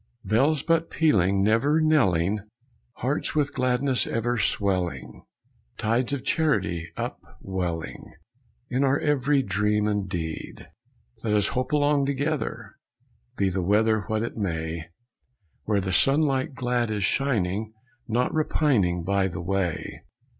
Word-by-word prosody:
Bells 135 +7 +2
but 165 0 +1
pealing, 100 - +2
never 120 +9 +3
knelling, 105 - +2 0.5
Hearts 135 +6 -2
with 145 -2 +1
gladness 125 -1 +1
ever 120 +1 -1
swelling. 95 -5 -1 0.6
Tides 120 +4 0
of 140 -3 -2
charity 100 - 0
up - - -4 0.2
welling 90 -4 -4 0.6
In 130 +2 +1
our 135 0 +3
every 145 -2 +2
dream 105 +1 +1
and 105 -2 -1
deed. 80 -4 -5 0.6
Let 110 -2 0
us 105 -1 +2
hope 125 0 -2
along 145 -1 +2
together, 140 +2 -3 0.6
Be 100 -1 +2
the 95 +1 -1
weather 105 +3 +2
What 110 -1 0
it 115 - -4
may, 80 -5 -3 0.8
Where 105 -2 +1
the 95 -1 -2
sunlight 135 0 +2
glad 125 -2 0
is 105 -2 -1
shining, 110 -4 0 0.4
Not 120 +2 0
repining 125 - +1
By 100 +1 +1
the 85 -2 -6
way. 95 -3 -2
110 Hz, 125 wpm, -25 LUFS, 95-140 Hz, 0.8 s, never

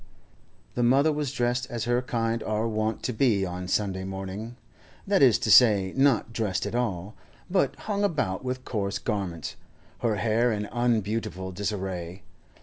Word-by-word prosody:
The 125 - -1
mother 135 +6 +4
was 145 -3 -2
dressed 120 +1 0
as 120 -2 -3
her 120 +1 +1
kind 115 -2 -1
are 110 +1 -1
wont 110 0 -2
to 125 - -1
be 110 -5 +2
on 90 0 -5
Sunday 95 -1 0
morning—that 105 - -5
is 125 -6 +6
to 110 - 0
say, 100 -6 +6
not 135 -4 +2
dressed 105 -4 -1
at - - -4
all, 105 -5 -2 0.4
but 185 - +2
hung 205 -1 -1
about 140 - 0
with 130 0 -4
coarse 100 -3 -2
garments, 100 -7 -3 0.4
her 115 -3 +1
hair 115 +3 +2
in 105 -1 -2
unbeautiful 110 -6 -1
disarray. 95 -2 -4
110 Hz, 150 wpm, -27 LUFS, 95-125 Hz, 0.4 s, is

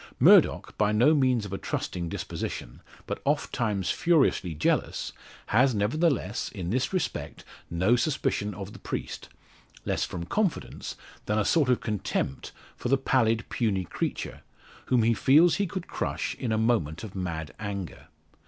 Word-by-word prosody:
Murdock, - - +5
by 105 -1 +3
no 120 +9 +5
means 130 -6 +2
of 100 - -7
a 95 - -3
trusting 85 -2 -3
disposition, - - -5 0.2
but - - -4
ofttimes 100 -6 0
furiously 150 - +2
jealous 75 - 0 0.4
has 125 +2 +4
nevertheless, 125 +2 0
in 90 -5 -4
this 130 +3 0
respect, 185 -4 -3 0.3
no 90 +8 +3
suspicion 115 - -1
of 100 +1 -7
the - - -11
priest, - - -5 0.6
less - - 0
from 85 - -4
confidence 200 - -2 0.3
than 105 - +1
a 105 - +2
sort 150 -6 +3
of 125 - +3
contempt 105 - -2 0.2
for - - -4
the 135 - +4
pallid 115 -4 +1
puny 105 -6 0
creature, 85 - -4 0.5
whom 125 -3 +3
he 115 +1 +4
feels 155 +9 +5
he 200 -1 0
could 185 0 -5
crush - - -3
in 125 -4 -3
a 110 - +2
moment 110 -9 +1
of 105 -4 -7
mad 85 -5 -4
anger. 100 -6 -5
110 Hz, 155 wpm, -27 LUFS, 95-130 Hz, 0.6 s, Murdock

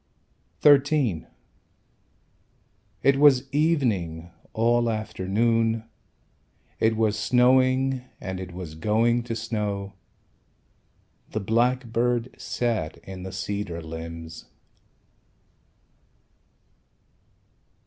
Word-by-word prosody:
XIII 140 - +4 1.8
It 140 0 +4
was 140 -2 +5
evening 105 - 0 0.2
all 120 +1 +2
afternoon. 110 +2 0 1.0
It 110 0 +2
was 110 -1 +1
snowing 130 +1 +3 0.2
And 95 -1 -5
it 95 -1 -7
was 90 -3 -7
going 110 +8 +1
to 115 -1 -5
snow. 105 -3 -3 1.4
The 110 - -3
blackbird 120 +2 0
sat 110 -10 -2
In 95 -1 -8
the 95 +1 -6
cedar 100 -2 -4
limbs. 80 0 -8
110 Hz, 75 wpm, -25 LUFS, 95-125 Hz, 1.8 s, was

